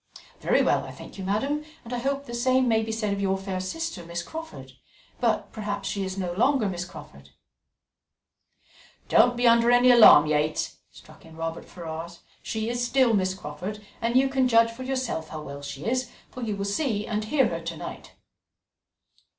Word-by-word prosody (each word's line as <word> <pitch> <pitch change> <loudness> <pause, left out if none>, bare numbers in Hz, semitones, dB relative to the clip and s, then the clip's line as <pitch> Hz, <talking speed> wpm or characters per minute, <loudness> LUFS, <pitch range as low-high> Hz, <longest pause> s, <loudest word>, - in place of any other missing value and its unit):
"Very - - +2
well, - - +2
I - - -8
thank - - -11
you, - - -4
madam; 270 +10 -1 0.2
and 235 - -7
I 245 - -1
hope 275 +2 -2
the 240 - -8
same 255 +1 +2
may 220 -1 +3
be 225 0 -3
said 215 -2 -1
of 200 - -3
your 195 -1 +1
fair 190 -1 -4
sister, 200 - -4
Miss 170 +1 -5
Crawford 320 - -8 0.5
but - - 0
perhaps 205 -2 -4
she 200 - -2
is 190 0 -4
no 180 -2 -2
longer 240 +3 +2
Miss 180 -1 -3
Crawford?" - - -13 1.8
"Don't 245 0 +5
be 245 0 +3
under 235 0 +5
any 245 +1 +6
alarm, 220 -10 +9
Yates," 150 0 0
struck - - -17
in 160 0 -14
Robert 165 0 -4
Ferrars; 170 0 -8 0.2
"she 220 0 -3
is 240 +1 -1
still 245 -1 +3
Miss 190 -2 +1
Crawford, 185 +5 -7 0.2
and 235 +1 0
you 265 +1 +5
can 265 -1 +2
judge 230 -1 +4
for 230 +3 -11
yourself 255 -11 -3
how 155 -1 -7
well 140 0 -8
she 140 0 -7
is, 255 +1 0 0.2
for 255 - -8
you 215 -3 -2
will 200 - -3
see 210 0 -1
and 215 -1 -2
hear 265 +2 +2
her 165 0 -4
to 165 0 -5
night." - - -8
215 Hz, 190 wpm, -26 LUFS, 180-245 Hz, 1.8 s, alarm